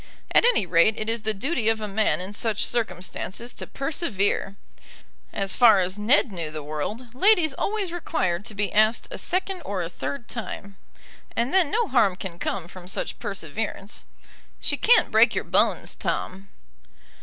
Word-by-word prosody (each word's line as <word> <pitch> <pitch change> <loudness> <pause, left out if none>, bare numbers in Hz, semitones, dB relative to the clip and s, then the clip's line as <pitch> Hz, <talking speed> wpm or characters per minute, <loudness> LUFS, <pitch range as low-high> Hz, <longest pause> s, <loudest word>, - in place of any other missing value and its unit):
At - - +5
any 485 - +4
rate 175 +5 +4
it 215 +1 -1
is 230 -1 -2
the 220 - 0
duty 240 +1 0
of 225 0 +1
a 215 - -4
man 210 0 +1
in 190 +3 -6
such 215 0 -1
circumstances 230 0 -3
to - - -8
persevere. 240 - -1 0.8
As 195 -1 -1
far 225 -5 +6
as 185 0 -1
Ned 235 +3 +4
knew 170 -4 -4
the 155 -1 -6
world, 210 - -5
ladies 340 0 +4
always 400 +2 -2
required 185 - -1
to 220 - -7
be 205 0 -1
asked 215 +2 +3
a - - -5
second 375 0 -2
or 195 -6 -3
a 165 - -4
third 265 +7 -5
time. 200 -4 -6 0.6
And 235 +3 0
then 370 -6 +4
no 455 +4 +1
harm 225 - +3
can 180 -2 -7
come 185 -4 -3
from 180 0 -12
such 190 - -4
perseverance. 205 +1 -4 0.6
"She - - +1
can't 480 - +4
break - - +5
your - - 0
bones, - - +2
Tom." 195 +1 -3
215 Hz, 170 wpm, -25 LUFS, 190-260 Hz, 0.8 s, far